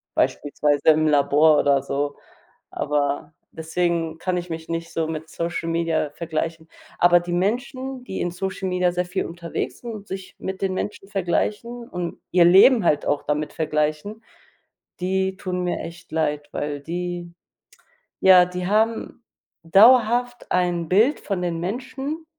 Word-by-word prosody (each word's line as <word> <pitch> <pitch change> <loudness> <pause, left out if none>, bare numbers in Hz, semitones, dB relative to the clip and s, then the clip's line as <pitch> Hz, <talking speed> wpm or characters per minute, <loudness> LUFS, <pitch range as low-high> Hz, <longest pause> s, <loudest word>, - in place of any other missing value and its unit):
beispielsweise 145 +1 +1
im 155 0 +4
Labor 150 +1 +4
oder 140 -1 +3
so, 145 +1 -2 0.5
aber 145 +1 -2 0.2
deswegen 165 0 -1
kann 180 0 -1
ich 175 0 -5
mich 160 0 -6
nicht 165 0 -4
so 160 -1 -1
mit 160 0 -5
Social 170 0 -3
Media 165 -3 0
vergleichen. 165 0 -4 0.3
Aber 175 0 +6
die 175 0 -5
Menschen, 255 +7 -2
die 190 - -4
in 175 - -1
Social 190 +1 -4
Media 180 -1 +1
sehr 180 0 -1
viel 190 +2 -2
unterwegs 170 0 -5
sind 240 - -7
und 210 -1 -9
sich 190 0 -7
mit 190 0 -5
den 190 -1 0
Menschen 200 0 -5
vergleichen 215 +6 -2
und 175 -1 -5
ihr 175 -1 +5
Leben 195 +5 +7
halt 150 -3 +2
auch 145 0 0
damit 150 +1 -2
vergleichen, 155 +7 -2 0.8
die 190 +1 0
tun 180 -1 -3
mir 180 - -1
echt 170 +2 -10
leid, 150 -2 -1
weil 145 -1 -3
die 175 +1 -5 0.9
ja, 185 -2 +8
die 180 0 -5
haben 225 +3 0 0.4
dauerhaft 240 +6 +4
ein 175 -2 0
Bild 220 +10 +3
von 195 -3 -3
den 170 -2 -2
Menschen 260 - -4
175 Hz, 150 wpm, -23 LUFS, 160-195 Hz, 0.9 s, ja